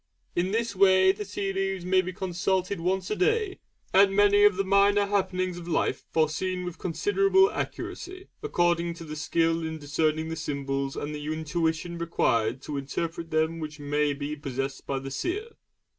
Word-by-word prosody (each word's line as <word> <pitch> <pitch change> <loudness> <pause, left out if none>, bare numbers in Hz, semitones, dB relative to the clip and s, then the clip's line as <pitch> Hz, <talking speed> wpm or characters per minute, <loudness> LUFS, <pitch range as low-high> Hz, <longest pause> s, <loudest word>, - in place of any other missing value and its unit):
In 175 +2 +1
this 225 0 -1
way 190 0 +6
the 205 +2 -6
tea 195 -1 -3
leaves 195 -2 -2
may 185 +1 +4
be 185 0 -5
consulted 185 +1 -1
once 185 +3 -1
a - - +1
day, 425 - +1 0.3
and 195 0 +5
many 205 0 +5
of 205 -2 +5
the 195 - +2
minor 200 +1 +4
happenings 185 -3 -1
of 170 - -10
life 165 - 0
foreseen 180 +4 0
with 180 -2 -6
considerable 390 - +3
accuracy, 375 -1 -5
according 175 - +1
to 165 - -9
the 155 -1 -7
skill 165 +2 +1
in 160 0 -3
discerning 155 +2 0
the 165 - -3
symbols 140 -3 -3
and 150 +1 -4
the 150 0 -6
intuition 160 +2 -2
required 125 -7 0
to 145 - -4
interpret 165 +4 -4
them 160 +1 0
which 155 -1 -6
may 145 +1 +1
be 145 +1 -4
possessed 135 -1 -4
by 135 - -1
the 135 0 -6
seer. 400 - -3
175 Hz, 175 wpm, -27 LUFS, 155-195 Hz, 0.3 s, way